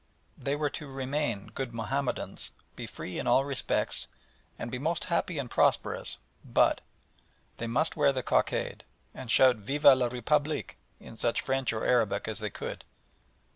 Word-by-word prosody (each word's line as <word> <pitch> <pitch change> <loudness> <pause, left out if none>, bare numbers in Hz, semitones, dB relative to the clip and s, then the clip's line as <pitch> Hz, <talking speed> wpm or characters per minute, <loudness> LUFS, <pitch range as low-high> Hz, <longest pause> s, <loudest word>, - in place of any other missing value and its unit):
They 140 +1 -2
were 145 -1 0
to 150 - -6
remain 135 -6 -2
good 125 -2 -4
Mahomedans, 125 +5 -2 0.3
be - - -6
free 90 - -6
in - - -3
all 130 +3 +4
respects, 140 -2 -1 0.5
and 115 - -5
be 125 - -3
most 165 +4 -1
happy 170 0 0
and 140 -3 -2
prosperous - - +1 0.3
but - - +3 0.8
they 115 - -3
must 130 +8 +1
wear 140 - +4
the 130 -2 -2
cockade, - - 0 0.3
and 125 - -8
shout 130 0 +6
"Vive 135 +8 -4
la 140 - +11 0.2
République" 145 +5 0 0.3
in - - -11
such 115 +1 0
French 135 -1 0
or 110 -1 -2
Arabic 120 -5 +2
as - - -3
they - - -2
could. - - -6
130 Hz, 160 wpm, -30 LUFS, 120-145 Hz, 0.8 s, la